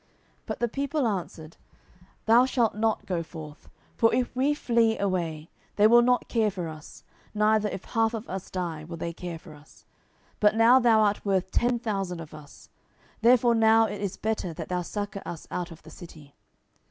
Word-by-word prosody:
10:018:003 - - -38 0.4
But - - -4
the 240 - +2
people 280 +2 -1
answered, 170 -5 -5 0.7
Thou 235 +3 +6
shalt 240 -4 +1
not 220 +1 -1
go 180 -3 -2
forth: 155 -3 -11 0.3
for 225 - +3
if 250 0 -1
we 275 +4 +1
flee 230 -5 +1
away, 170 -5 -2 0.2
they 205 - +4
will 240 +2 +7
not 245 +1 +2
care 225 -3 +1
for 180 -4 -5
us; 155 -1 -11 0.3
neither 210 0 +2
if 190 -1 -7
half 225 0 0
of 220 +1 -7
us 190 -1 -6
die, 170 -4 -4
will 170 +1 -8
they 170 +1 -4
care 175 0 -6
for 160 -1 -14
us: 150 +1 -19 0.5
but 210 0 +4
now 230 +3 +6
thou 230 -3 +4
art 210 -1 +1
worth 190 -2 0
ten 240 0 +1
thousand 195 -6 -3
of 160 -2 -10
us: 150 -2 -14 0.5
therefore 240 0 +5
now 225 0 +5
it 205 -2 -5
is 195 -1 -3
better 210 -6 -3
that - - -7
thou 180 0 -1
succour 205 +2 -5
us 165 - -8
out 180 0 -3
of 165 -2 -13
the - - -13
city. 155 -5 -13
205 Hz, 190 wpm, -26 LUFS, 170-225 Hz, 0.7 s, will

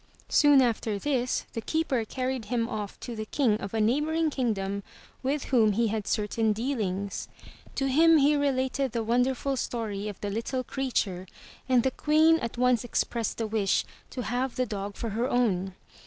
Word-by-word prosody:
Soon 290 -3 +6
after 225 -3 0
this, 255 +1 -1
the 230 - -3
keeper 275 -3 0
carried 255 0 -3
him 230 +1 -1
off 210 -4 -5
to 240 - -6
the 215 0 -5
King 225 -6 +1
of 200 - -5
a 225 - -1
neighboring 300 +8 +1
kingdom 200 -7 -1 0.4
with 275 +2 -1
whom 225 -5 +3
he 230 +2 +1
had 215 -1 -3
certain 215 +1 +1
dealings. 205 -5 -2 0.5
To 270 - 0
him 320 +4 +5
he 295 +1 +4
related 270 -2 0
the 230 -2 -1
wonderful 250 +4 +1
story 215 -5 -3
of 205 -3 -6
the 205 - -3
little 235 +4 -2
creature 215 -9 -2 0.4
and 250 -2 +4
the 265 - +1
Queen 315 +4 +4
at 230 -3 -5
once 250 -1 +3
expressed 235 -1 -1
the 225 - -1
wish 210 -3 +1 0.2
to 250 - -5
have 250 +2 -2
the 255 - +1
dog 200 -3 -5
for 230 - -4
her 235 +5 -1
own. 195 -6 +1
240 Hz, 175 wpm, -28 LUFS, 215-265 Hz, 0.5 s, Soon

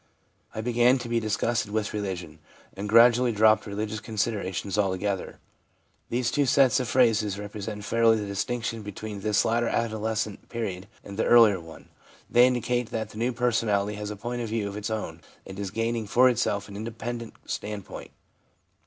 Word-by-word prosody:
I 110 - -2
began 120 +2 +3
to 120 -2 -6
be 120 0 +1
disgusted 110 +1 -1
with 105 0 -2
religion, 95 -6 -5 0.4
and 100 +2 -5
gradually 120 +2 +6
dropped 110 0 +4
religious 105 +1 -3
considerations 105 -3 -2
altogether/ 100 -1 -1 0.7
These 120 0 0
two 145 -2 +1
sets 135 -2 +4
of 125 - -2
phrases 110 -5 +2
represent 105 0 -6
fairly 115 0 +3
the 105 - -3
dis 100 0 -2
tinction 115 -2 -3
between 105 0 -7
this 105 0 +2
later 115 +1 +1
adolescent 110 -2 -2
period 100 -6 -4 0.2
and 100 0 -9
the - - +1
earlier 115 -5 +6
one. 80 -1 -13 0.4
They 120 +1 +7
indicate 125 -1 -1
that 110 -2 -4
the 110 - -9
new 120 +2 +1
personality 110 -4 0
has 105 0 -5
a 105 - -5
point 120 +4 -4
of 115 - -4
view 110 -2 -1
of 100 - -6
its 105 +1 -4
own, 95 -7 -4 0.2
and 95 +1 -9
is 100 -2 -3
gaining 115 +1 -2
for 125 +5 +5
itself 105 -4 -1
an 100 - -10
independent 115 +2 -6
standpoint. 105 -2 -6
110 Hz, 170 wpm, -26 LUFS, 105-120 Hz, 0.7 s, They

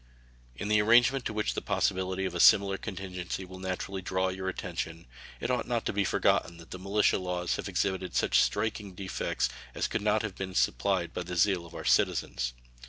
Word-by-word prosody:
In 105 - -4
the 105 0 +4
arrangement 120 +4 +4
to - - -1
which 105 0 -1
the - - -3
possibility 95 0 0
of 95 - -3
a 90 - -3
similar 100 +2 +6
contingency 95 -2 -5
will 95 +1 -11
naturally 95 +1 -4
draw 95 +1 0
your 95 0 -3
attention 85 -2 -5 0.3
it 125 - -2
ought 125 - -1
not 120 -2 -1
to - - -1
be 100 0 +1
forgotten 85 -3 +1
that 85 -1 -14
the 95 - -6
militia 100 +2 +2
laws 90 -1 -2
have - - -4
exhibited 95 -1 -1
such - - +4
striking 105 -4 -1
defects 95 0 -1 0.3
as - - 0
could 115 - -2
not 105 +1 +2
have 110 -3 -3
been 95 0 -6
supplied 85 +7 +1
by - - -3
the 90 0 -5
zeal 90 -1 +2
of - - -14
our - - -7
citizens. - - +1
95 Hz, 200 wpm, -29 LUFS, 90-105 Hz, 0.3 s, similar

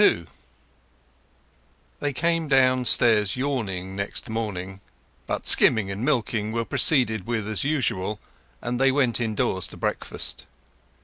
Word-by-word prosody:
XXII 85 - +3 1.7
They 145 - -2
came 165 +4 -1
downstairs 125 -6 +3
yawning 100 -9 -3
next 100 +2 -3
morning; 95 -4 -5 0.5
but - - -4
skimming 105 -4 +6
and 100 +4 -5
milking 115 -6 -1
were 115 0 -2
proceeded 120 - +1
with 110 -3 -3
as 110 -1 -2
usual, 115 -9 -2 0.4
and 120 +1 -3
they 135 0 +3
went 130 -4 +1
indoors 105 -5 -1
to - - -12
breakfast. - - -4
115 Hz, 120 wpm, -24 LUFS, 105-130 Hz, 1.7 s, skimming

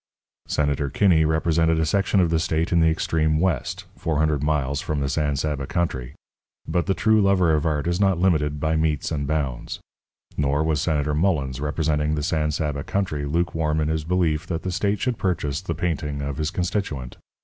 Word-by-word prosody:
Senator 70 -1 0
Kinney 80 +1 +3
represented 80 +1 +2
a 80 - +2
section 100 +4 +2
of 85 -3 +2
the 80 - +2
state 80 0 0
in 85 - +4
the 80 0 +5
extreme 80 -1 +1
West 85 -7 -1
400 75 -2 0
miles 75 -2 0
from 75 -4 -2
the 70 - -1
San 75 +1 0
Saba 70 -1 -2
country 65 -7 -2 0.5
but 85 +3 0
the 95 - +1
true 110 -1 +3
lover 95 -4 +3
of 75 +1 +1
art 75 -1 0
is 85 +1 0
not 95 -3 +3
limited 75 -5 +1
by 80 +2 0
metes 80 -1 0
and 70 -3 -2
bounds. 70 -5 -2 0.6
Nor 75 +1 +1
was 80 -2 +1
Senator 75 -3 0
Mullens, 75 -6 0
representing 75 0 0
the 75 - -2
San 80 -2 0
Saba 75 -1 -2
country, 85 -8 -2
lukewarm 80 -1 0
in 75 0 0
his 80 -1 -1
belief 85 -1 0
that 80 -2 -3
the 95 - -2
state 100 +3 0
should 125 -3 -1
purchase 75 -6 -1
the 85 -4 -4
painting 75 -4 -2
of 70 -1 -4
his 75 0 -1
constituent. 90 -9 -3
80 Hz, 190 wpm, -23 LUFS, 75-85 Hz, 0.6 s, the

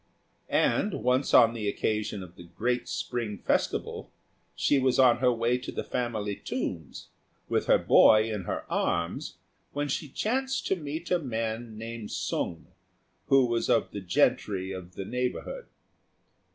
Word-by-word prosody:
And 205 -3 +2
once, 125 +2 +2
on 115 - +7
the 105 -3 -2
occasion 105 -1 -2
of 90 -1 -13
the 85 - -12
great 120 +8 -2
spring 115 -4 -3
festival, - - -1 0.4
she 145 - +2
was 130 -1 +2
on 125 -3 +6
her 125 0 +3
way 120 +1 +1
to 125 - -6
the - - -4
family 110 -4 -2
tombs, 80 -6 -5 0.4
with - - 0
her - - +6
boy 110 0 +6
in 100 -4 -4
her - - -3
arms, 85 0 -1 0.4
when 145 +1 -1
she 145 +2 -3
chanced 260 - -1
to - - +1
meet 160 +1 -6
a 180 - +3
man 115 -4 -4
named 115 -1 -6
Sung, 80 -1 -3 0.6
who 135 -1 +5
was 120 -1 -1
one - - +6
of - - -5
the 100 - -5
gentry 95 +1 +1
of 90 -1 -8
the 95 - -5
neighbourhood. 125 - -3
115 Hz, 155 wpm, -28 LUFS, 105-130 Hz, 0.6 s, on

